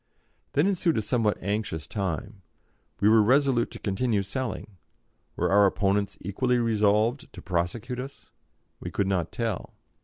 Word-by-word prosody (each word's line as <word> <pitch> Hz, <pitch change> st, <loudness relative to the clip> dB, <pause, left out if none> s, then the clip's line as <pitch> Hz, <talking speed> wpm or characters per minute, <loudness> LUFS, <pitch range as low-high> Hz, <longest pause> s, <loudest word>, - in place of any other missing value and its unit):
Then 145 Hz, -, +3 dB
ensued 180 Hz, -, +1 dB
a -, -, +2 dB
somewhat 110 Hz, -1 st, +1 dB
anxious 100 Hz, -7 st, -2 dB
time. 95 Hz, -6 st, -4 dB, 0.6 s
We 100 Hz, -, +4 dB
were 110 Hz, 0 st, +6 dB
resolute 130 Hz, +1 st, +3 dB
to -, -, -9 dB
continue 105 Hz, +1 st, 0 dB
selling; 110 Hz, -1 st, -5 dB, 0.6 s
were -, -, 0 dB
our 100 Hz, 0 st, +6 dB
opponents 100 Hz, 0 st, 0 dB
equally 125 Hz, +7 st, 0 dB
resolved 110 Hz, +2 st, +1 dB
to -, -, -9 dB
prosecute 95 Hz, +8 st, -2 dB
us? 135 Hz, +2 st, -9 dB, 0.5 s
We -, -, -6 dB
could 100 Hz, -, -1 dB
not 90 Hz, -4 st, -1 dB
tell. 115 Hz, -5 st, -3 dB
105 Hz, 145 wpm, -27 LUFS, 100-125 Hz, 0.6 s, were